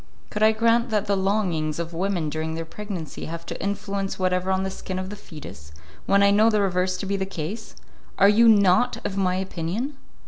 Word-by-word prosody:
"Could 210 - -3
I 215 0 +6
grant 230 +2 +2
that 210 -2 0
the 200 - +1
longings 190 -6 0
of 170 0 -4
women 175 -2 -1
during 160 +1 -3
their 165 0 -4
pregnancy 180 -4 -6
have 165 +1 -6
no - - -4
influence 200 -1 -3
whatever 185 0 0
on 190 0 +1
the 190 - -2
skin 190 0 -6
of 185 +1 -4
the - - -5
foetus, 150 - -11 0.4
when 200 0 +4
I 200 - +5
know 215 +3 +5
the 215 -2 +2
reverse 185 -2 +1
to 195 - -5
be 200 +1 -1
the 190 - -1
case? 195 +5 -6 0.4
Are 195 - +6
you 225 +3 +6
not 205 +3 +4
of 195 - -2
my 185 -2 +1
opinion?" 190 - -3
190 Hz, 210 wpm, -24 LUFS, 175-210 Hz, 0.4 s, I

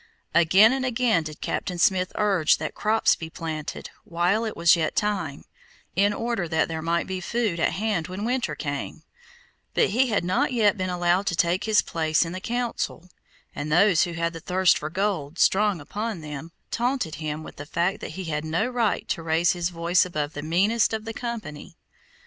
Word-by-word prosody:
Again 190 +8 +6
and 265 -1 -1
again 245 -6 +2
did 155 -1 -8
Captain 180 -2 -3
Smith 185 +1 +2
urge 195 -7 +3
that 155 - -4
crops 220 +1 +2
be 160 - -7
planted, 160 -2 -6
while 190 +3 0
it 220 - -5
was 170 +1 +6
yet 160 -2 -1
time, 195 -9 -2 0.5
in 200 +3 +3
order 230 -4 -2
that 160 -1 +1
there 160 -1 -4
might 170 +1 0
be 185 -1 -4
food 215 -3 -1
at - - +1
hand 205 -5 -1
when 185 +2 -6
the - - -2
winter 250 +1 -1
came; - - -5 0.7
but - - +3
he 255 +5 +3
had 210 -7 0
not 245 +12 +1
yet 215 -4 +3
been 185 -2 -2
allowed 180 +2 +1
to 175 - +1
take 170 +3 +1
his 220 -1 +3
place 160 0 +1
in 165 - -5
the 185 +1 -6
Council, 235 -6 -3 0.4
and 150 +1 -5
those 180 +1 +5
who 175 - -6
had 170 +1 -1
the 165 - -7
thirst 185 +2 +3
for 150 - -4
gold 180 -4 -2
strong 205 -2 +3
upon 205 +5 -4
them, 150 +1 -7 0.2
taunted 240 - -1
him 155 0 -4
with - - -11
the 145 - -8
fact 175 +5 0
that - - -7
he 190 - -4
had 150 -3 -3
no 160 +7 0
right 240 -4 0
to - - -1
raise 165 +1 +2
his 175 -1 -1
voice 170 +1 +2
above 150 -4 -3
the 145 - -5
meanest 200 +9 +2
of 220 0 -3
the 225 - -5
company. 220 -11 -6
180 Hz, 200 wpm, -25 LUFS, 165-215 Hz, 0.7 s, Again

